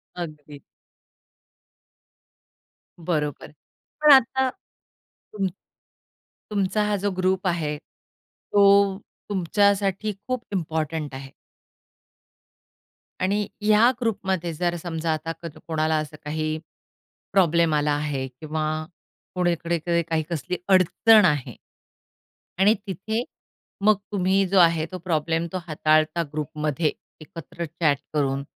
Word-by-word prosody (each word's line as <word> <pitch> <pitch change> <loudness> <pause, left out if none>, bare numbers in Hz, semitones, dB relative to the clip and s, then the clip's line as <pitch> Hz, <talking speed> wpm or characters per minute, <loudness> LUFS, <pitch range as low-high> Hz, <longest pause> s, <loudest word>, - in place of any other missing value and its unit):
अगदी. 150 -4 -8 2.4
बरोबर 155 -4 -2
आहे. - - -15 0.5
पण 300 -1 +7
आता 265 0 +4
तुम 205 - -9 1.0
तुमचा 200 +1 +1
हा 210 0 +1
जो 200 +1 -1
ग्रुप 185 +1 +1
आहे, 160 -4 -1
तो 200 +4 +1 0.3
तुमच्यासाठी 200 +2 +1
खूप 255 -2 -2
इम्पोर्टंट 160 -4 -2
आहे. 135 0 -9 1.9
आणि 200 +2 +1
ह्या 215 +3 +5
ग्रुपमध्ये 190 -7 -1
जर 175 +2 -1
समजा 165 -2 -1
आता 155 +1 -4
क - - -10 0.2
कोणाला 160 -1 +1
असं 155 0 -4
काही 155 +1 -2 0.8
प्रॉब्लेम 170 -4 +3
आला 150 0 +2
आहे 145 -2 -2
किंवा 155 +4 -4 0.7
कुणीकडे 170 -1 0
काही 160 -1 +1
कसली 180 +2 -3
अडचण 195 +3 +5
आहे. 145 -7 0 1.0
आणि 200 +3 +6
तिथे, 220 +5 -2 0.6
मग 215 0 +6 0.2
तुम्ही 195 0 +2
जो 190 +1 +3
आहे 165 -2 +4
तो 185 - -4
प्रॉब्लेम 165 0 0
तो - - 0
हाताळता 155 +1 +2
ग्रुपमध्ये 150 0 -1 0.3
एकत्र 165 +2 -7
चॅट 155 -2 +1 0.2
करून 140 -2 0
170 Hz, 105 wpm, -24 LUFS, 155-195 Hz, 2.4 s, पण